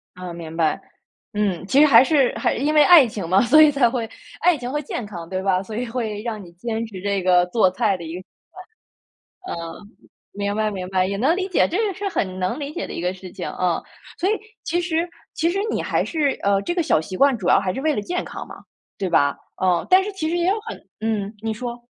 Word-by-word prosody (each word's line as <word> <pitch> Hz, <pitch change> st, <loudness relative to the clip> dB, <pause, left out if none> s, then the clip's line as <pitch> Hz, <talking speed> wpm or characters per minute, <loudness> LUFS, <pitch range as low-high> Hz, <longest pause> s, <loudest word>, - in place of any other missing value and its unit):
啊， 180 Hz, -1 st, -7 dB
明 165 Hz, -1 st, -8 dB
白。 160 Hz, -2 st, +1 dB, 0.5 s
嗯， 200 Hz, -4 st, -1 dB
其 265 Hz, +8 st, +3 dB
实 300 Hz, -, +7 dB
还 235 Hz, -2 st, +8 dB
是 275 Hz, -3 st, +3 dB
还 -, -, +1 dB
因 290 Hz, +5 st, 0 dB
为 300 Hz, -, +7 dB
爱 310 Hz, -4 st, +8 dB
情 205 Hz, -6 st, -5 dB
嘛， 185 Hz, +3 st, +4 dB
所 275 Hz, +6 st, +6 dB
以 305 Hz, -1 st, +7 dB
才 265 Hz, -4 st, +3 dB
会 235 Hz, -2 st, -3 dB, 0.3 s
爱 360 Hz, -2 st, +4 dB
情 250 Hz, -1 st, -5 dB
会 295 Hz, +1 st, -1 dB
健 250 Hz, -4 st, -4 dB
康， 170 Hz, -5 st, -8 dB
对 185 Hz, +1 st, -3 dB
吧？ 190 Hz, -1 st, +1 dB
所 215 Hz, +2 st, -8 dB
以 245 Hz, +3 st, -2 dB
会 225 Hz, -3 st, -3 dB
让 220 Hz, -3 st, -5 dB
你 175 Hz, -, -13 dB
坚 225 Hz, +5 st, -3 dB
持 195 Hz, -4 st, -9 dB
这 200 Hz, -2 st, -1 dB
个 180 Hz, -1 st, +4 dB
做 185 Hz, -1 st, +3 dB
菜 200 Hz, 0 st, +1 dB
的 170 Hz, -, -9 dB
一 160 Hz, +1 st, -6 dB
个 180 Hz, -, -6 dB
习 -, -, -21 dB, 1.2 s
惯。 -, -, -4 dB
嗯， 170 Hz, +5 st, -8 dB, 0.4 s
明 200 Hz, 0 st, -2 dB
白 215 Hz, 0 st, +1 dB
明 185 Hz, -3 st, -5 dB
白， 185 Hz, -1 st, +1 dB
也 200 Hz, -, -2 dB
能 280 Hz, -, +2 dB
理 375 Hz, -, -1 dB
解 370 Hz, -, +2 dB
这 355 Hz, -, -1 dB
个 390 Hz, -, -3 dB
是 395 Hz, +2 st, -3 dB
很 185 Hz, -, -2 dB
能 185 Hz, +10 st, -1 dB
理 290 Hz, +1 st, -5 dB
解 350 Hz, -, -4 dB
的 -, -, -8 dB
一 -, -, -4 dB
个 180 Hz, +1 st, -1 dB
事 185 Hz, -1 st, -11 dB
情， 180 Hz, -, -6 dB
嗯。 180 Hz, -2 st, -1 dB, 0.4 s
所 370 Hz, -, +1 dB
以 -, -, +3 dB, 0.3 s
其 350 Hz, +1 st, 0 dB
实 340 Hz, 0 st, -1 dB, 0.2 s
其 330 Hz, +1 st, +1 dB
实 390 Hz, +3 st, -1 dB
你 -, -, -1 dB
还 -, -, 0 dB
是， 295 Hz, -5 st, 0 dB
呃， 200 Hz, 0 st, +2 dB
这 345 Hz, -, -2 dB
个 345 Hz, -, +1 dB
小 230 Hz, -, +3 dB
习 185 Hz, +4 st, -6 dB
惯 275 Hz, +2 st, +4 dB
主 185 Hz, -, -4 dB
要 -, -, +5 dB
还 185 Hz, -2 st, -1 dB
是 -, -, -4 dB
为 310 Hz, -1 st, +1 dB
了 210 Hz, -, -1 dB
健 355 Hz, +9 st, -3 dB
康 -, -, -7 dB
嘛， -, -, -11 dB, 0.4 s
对 190 Hz, -2 st, -2 dB
吧？ 140 Hz, -3 st, +2 dB, 0.3 s
嗯， 180 Hz, -2 st, +2 dB
但 370 Hz, +1 st, +6 dB
是 415 Hz, -, -4 dB
其 320 Hz, -5 st, -3 dB
实 345 Hz, -, 0 dB
也 345 Hz, -, +1 dB
有 420 Hz, +3 st, +1 dB
很 -, -, -5 dB, 0.2 s
嗯， 215 Hz, -2 st, -2 dB
你 225 Hz, 0 st, -2 dB
说。 240 Hz, +1 st, -6 dB
220 Hz, 275 characters per minute, -22 LUFS, 185-295 Hz, 1.2 s, 还